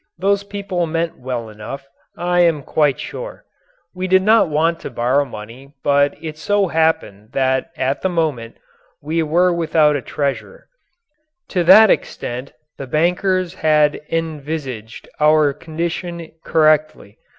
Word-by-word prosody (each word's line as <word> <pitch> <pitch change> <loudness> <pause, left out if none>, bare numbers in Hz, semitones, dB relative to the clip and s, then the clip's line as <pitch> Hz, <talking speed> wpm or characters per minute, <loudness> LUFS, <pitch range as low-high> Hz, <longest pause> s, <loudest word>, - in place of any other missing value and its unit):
Those 200 +3 +1
people 200 -4 -3
meant 165 +1 -2
well 125 -3 -4
enough, 110 +6 -9 0.3
I 175 +1 0
am 165 -5 +3
quite 145 -2 +1
sure. - - -7 0.5
We 185 0 -3
did 190 0 +4
not 220 -3 +4
want 165 +2 +1
to - - -7
borrow 130 +3 +1
money 125 +4 -11
but 140 0 +2
it 155 -1 -7
so 205 +2 +1
happened 160 -11 -1
that 130 -1 0
at 130 +2 -1
the 190 - 0
moment 150 -10 -2 0.4
we 160 +3 -1
were 175 +3 +2
without 155 -3 +2
a 140 - -2
treasurer. 145 - -4 0.8
To 180 -3 0
that 215 +4 +8
extent 125 +3 -3 0.3
the 135 - -6
bankers 180 +4 0
had 150 -4 +2
envisaged 150 -8 -5
our 150 -1 +4
condition 170 +2 -5
correctly. 155 -9 +1
155 Hz, 135 wpm, -19 LUFS, 140-175 Hz, 0.8 s, that